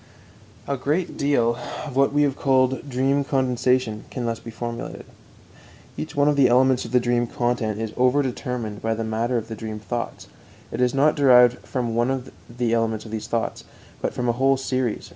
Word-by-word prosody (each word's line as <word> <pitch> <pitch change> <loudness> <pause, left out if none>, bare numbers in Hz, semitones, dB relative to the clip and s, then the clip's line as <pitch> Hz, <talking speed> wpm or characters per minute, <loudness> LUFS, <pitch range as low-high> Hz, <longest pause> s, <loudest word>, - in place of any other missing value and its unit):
A 140 - -1
great 150 +7 -1
deal 120 -5 +1 0.3
of 140 -4 -7
what 135 0 +3
we 145 +1 +3
have 140 -2 +1
called 130 0 +1
"dream 135 +2 +1
condensation" 125 -4 0
can 125 - -5
be - - -2
thus 115 -1 -2
formulated. 115 +1 -6 0.9
Each 75 - -6
one 145 0 +3
of 150 - +3
the 140 -2 +5
elements 130 +1 +3
of 115 - -8
the 125 - +4
dream 120 0 +1
content 120 -3 -1
is 110 -1 -3
overdetermined 125 -4 -1
by 110 0 0
the 115 - -3
matter 115 +3 -1
of 115 -1 -4
the 115 - -6
dream 110 0 -6
thoughts; 120 +2 -5 0.4
it - - -3
is 125 +1 +2
not 145 +3 +4
derived 125 -3 +6
from 120 -4 -2
one 125 +2 -1 0.3
element 115 -2 0
of 110 - -9
these 110 -1 -4
thoughts, 115 -1 -2 0.4
but - - -1
from 125 - -3
a - - +4
whole 135 +2 +3
series. 130 -3 -2
125 Hz, 185 wpm, -23 LUFS, 115-135 Hz, 0.9 s, derived